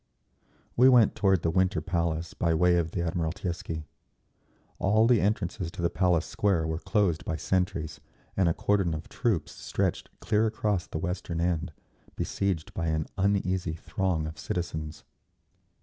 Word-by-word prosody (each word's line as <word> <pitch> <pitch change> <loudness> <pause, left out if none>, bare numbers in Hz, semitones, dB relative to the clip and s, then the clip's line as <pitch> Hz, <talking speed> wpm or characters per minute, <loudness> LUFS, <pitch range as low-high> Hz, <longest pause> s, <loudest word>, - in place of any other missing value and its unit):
We 125 +2 +7
went 120 -5 +6
toward 95 -4 +2
the 85 - +2
Winter 95 +2 +2
Palace 85 -2 -2
by 85 -1 +1
way 90 +2 +4
of 85 -2 0
the 85 - -3
Admiralteisky. 85 -1 -3 1.0
All 110 +4 +4
the 120 -1 +4
entrances 95 -4 -1
to - - -6
the 85 - +2
Palace 90 -3 +2
Square 95 -6 +1
were 80 0 -2
closed 95 -6 +1
by 80 - -2
sentries, 90 0 -1 0.3
and 95 -3 +3
a - - +2
cordon 95 -5 +1
of 75 - -8
troops 110 - -1
stretched - - -2
clear 110 +1 +2
across 105 -4 -1
the - - -5
western 90 0 -3
end, 85 -1 0 0.4
besieged 100 0 -2
by 85 -2 -2
an 80 -1 0
uneasy 95 -3 +1
throng 80 0 -1
of 80 0 -7
citizens. 80 -3 -4
90 Hz, 150 wpm, -28 LUFS, 80-100 Hz, 1.0 s, We